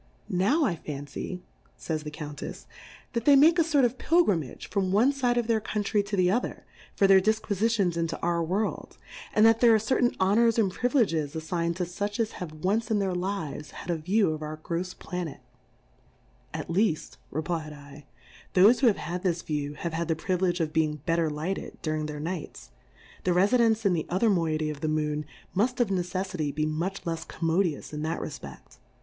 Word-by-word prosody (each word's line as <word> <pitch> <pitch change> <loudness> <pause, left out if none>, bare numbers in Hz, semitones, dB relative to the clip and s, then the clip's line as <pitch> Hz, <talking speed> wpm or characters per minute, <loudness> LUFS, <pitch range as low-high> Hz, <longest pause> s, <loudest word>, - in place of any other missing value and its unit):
Now 210 - +2
I 175 -9 0
fancy, 145 +5 -6 0.4
Jays 155 -2 -3
the 150 - -6
Count 150 -1 -7
efs^ - - -7 0.5
that 235 -1 -2
they 285 - +7
make 320 +5 +6
a - - +6
fort 295 -5 +3
of 245 +2 -2
Pil 340 +1 +4
grimage 165 - -2
from 190 -1 -1
one 235 +8 +4
Side 250 -3 +1
of 240 - +1
their 225 -1 +1
Coun 210 0 -2
try 205 +1 +1
to 200 0 -4
the 180 -1 +4
other, 240 +5 -2 0.3
for 200 - +3
their 195 -1 +7
Difquifitions 215 -2 +1
into 165 -1 -2
our 170 0 0
World, 195 +6 -2 0.4
and 215 - +6
that 225 0 +5
there 235 -2 +6
are - - +6
cer 220 +5 0
tain 245 - +2
Honours 225 +5 +3
and 205 -5 +3
Priviledges 180 - +1
ailign'd 170 +1 -2
to 185 - -2
fuch, 205 +5 -4
as 225 -1 +1
have 180 -4 -7
once 195 +8 -1
in 220 - +2
their 195 -2 0
Lives 180 -5 -3
had 180 - -6
a - - +1
View 185 +3 +2
of 155 0 -4
our 155 0 -5
grofs 170 +3 -4
Planet, 180 -4 -5 1.1
At - - -5
leaft, 175 -2 0
reflfd 160 +1 -2
7, 145 -1 -12 0.6
thofe 235 +4 +6
who 265 - +4
have 215 - +4
had 175 +1 -4
this 175 -3 -1
View 145 -1 -3
have 170 +1 -4
had 165 0 -2
the 165 - +1
Priv 180 +3 -2
Hedge 180 -1 +1
of 155 -1 -1
being 155 -1 +1
better 165 -1 +1
lighted, 155 +6 -4
during 155 -1 -1
their 150 -1 -6
Nights, 160 - -6 0.5
the 180 - +2
Refi 200 +8 +4
dence 225 -2 +3
in 195 - +4
the 165 - -2
other 200 +5 +2
Moiety 155 -4 0
of 145 -1 -9
the 155 - -1
Moon 150 -1 -1 0.3
muft 245 +6 +1
of 240 -4 +2
Neceffity 180 -4 -2
be 155 - +1
much 170 +6 -2
lefs 165 0 -3
com 165 - -3
modious 165 -4 0
in 150 - -4
that 160 +2 -2
Refpeft. 150 - -9
180 Hz, 205 wpm, -27 LUFS, 155-215 Hz, 1.1 s, they